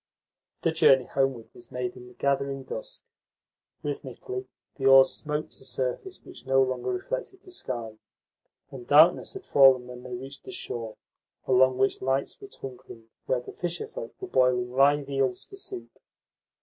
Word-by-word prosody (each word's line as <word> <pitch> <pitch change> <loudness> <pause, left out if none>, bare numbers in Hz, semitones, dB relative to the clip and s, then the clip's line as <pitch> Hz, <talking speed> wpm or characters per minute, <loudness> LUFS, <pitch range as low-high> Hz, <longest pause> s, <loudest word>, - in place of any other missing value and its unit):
The 165 - +3
journey 145 -6 +5
homeward 135 -4 -1
was 120 -1 -14
made 125 -1 -3
in 125 -1 -11
the 125 - -16
gathering 140 -1 0
dusk. - - -7 0.8
Rhythmically 390 0 -5 0.3
the 135 -2 +1
oars 135 0 +8
smote 150 0 -3
a - - -15
surface 130 - -4
which - - -11
no 135 0 +4
longer 125 -1 -2
reflected 130 - -4
the 370 - -14
sky, 115 - -5 0.7
and 125 -3 -9
darkness 155 +4 +6
had 390 - -8
fallen 135 -3 +6
when 125 0 -9
they 125 -1 -6
reached 135 +3 -9
the 390 - -9
shore, 115 - -5 0.5
along 130 0 +4
which 130 +1 +1
lights 135 - -1
were 400 - -9
twinkling 125 - -10 0.2
where 130 -1 +1
the - - -9
fisherfolk 440 - -5
were 380 - -6
boiling 125 - +2
live 140 +2 +4
eels 135 -3 0
for 395 - -13
soup. 385 -1 -7
135 Hz, 160 wpm, -27 LUFS, 125-155 Hz, 0.8 s, oars